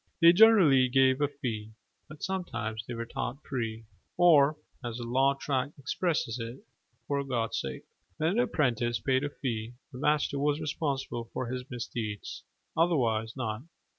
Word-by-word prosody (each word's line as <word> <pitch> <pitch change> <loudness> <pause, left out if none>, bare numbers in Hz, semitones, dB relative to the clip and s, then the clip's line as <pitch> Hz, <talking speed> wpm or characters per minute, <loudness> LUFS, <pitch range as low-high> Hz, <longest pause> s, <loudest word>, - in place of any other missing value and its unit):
They 170 -1 +8
generally 175 - +6
gave 130 +1 +4
a 145 - +4
fee: 115 -7 -5 0.4
but 155 -1 -11
sometimes 120 - -3
they 120 - -4
were 115 0 -4
taught 125 +4 -5
free 115 -5 -3 0.3
or 155 -4 +6 0.3
as 120 -1 -4
the 120 - -5
law 135 +4 +2
tract 140 +1 -2
expresses 140 -3 -1
it 115 +3 -7 0.4
"for 140 -1 0
God's 120 -4 -1
sake." 65 -1 -6 0.3
When 160 +2 +1
an 215 - +1
apprentice 120 - +1
paid 130 0 +1
a 145 - -1
fee, 115 -5 -4 0.2
the 125 - -9
master 150 -1 +1
was 145 +1 +1
responsible 140 -6 -2
for 125 -1 -3
his 125 0 -5
misdeeds: 115 -4 -5 0.3
otherwise 120 -9 +1
not. 110 -3 -3
130 Hz, 155 wpm, -29 LUFS, 115-145 Hz, 0.4 s, They